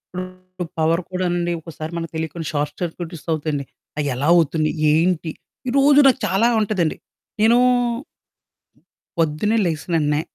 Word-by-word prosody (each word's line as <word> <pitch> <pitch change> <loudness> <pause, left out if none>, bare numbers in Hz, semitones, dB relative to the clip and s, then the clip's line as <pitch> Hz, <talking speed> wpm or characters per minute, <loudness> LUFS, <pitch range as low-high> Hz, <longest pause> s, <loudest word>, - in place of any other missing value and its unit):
ఇప్పుడు 185 -1 -7
పవర్ 165 +2 +2
కూడానండి 175 -1 0
ఒకసారి 160 0 -7
మనకి 165 -1 -4
తెలియకుండా 160 0 -4
షార్ట్ 145 0 -1
సర్క్యూట్స్ 170 -1 -5
అవుతాయండి. 150 -3 -1 0.3
అయ్యెలా 140 -1 -1
అవుతుంది, 160 -2 +2 0.2
ఏంటి? 165 0 +1 0.4
ఈరోజు 280 +2 +5
నాకు 265 0 +4
చాలా 195 +5 +3
ఉంటదండి. 195 -7 0 0.4
నేనూ 225 +3 +5 1.6
పొద్దున్నే 165 +7 +1
లేచిన 165 0 -2
వెంటనే, 150 -1 +1
170 Hz, 115 wpm, -21 LUFS, 155-185 Hz, 1.6 s, ఈరోజు